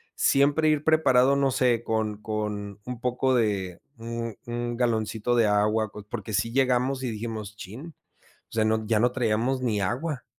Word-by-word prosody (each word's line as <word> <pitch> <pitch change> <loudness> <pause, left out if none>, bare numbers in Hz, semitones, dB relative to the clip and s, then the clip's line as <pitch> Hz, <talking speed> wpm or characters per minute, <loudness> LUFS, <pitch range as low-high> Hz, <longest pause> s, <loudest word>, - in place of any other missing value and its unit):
siempre 145 +3 +3
ir 150 -1 +2
preparado, 140 -4 +4
no 140 -1 +2
sé, 125 -3 +2
con 110 -2 -2
con 105 -2 -4
un 125 0 -6
poco 125 +2 0
de 100 -6 0 0.2
un 115 -1 -5
un 120 0 -3
galoncito 115 -1 0
de 115 -2 +4
agua, 105 +1 +2 0.2
porque 110 -1 -5
sí 115 +4 0
llegamos, 130 +1 +1
y 125 - -2
dijimos: 110 -2 -5
"Chin", 130 - -9 0.5
o - - -32
sea, 110 -1 +1
no, 110 0 0
ya 110 -1 +2
no 120 +1 +3
traíamos 125 +1 0
ni 110 -5 0
agua, 130 - -2
115 Hz, 170 wpm, -26 LUFS, 110-130 Hz, 0.5 s, preparado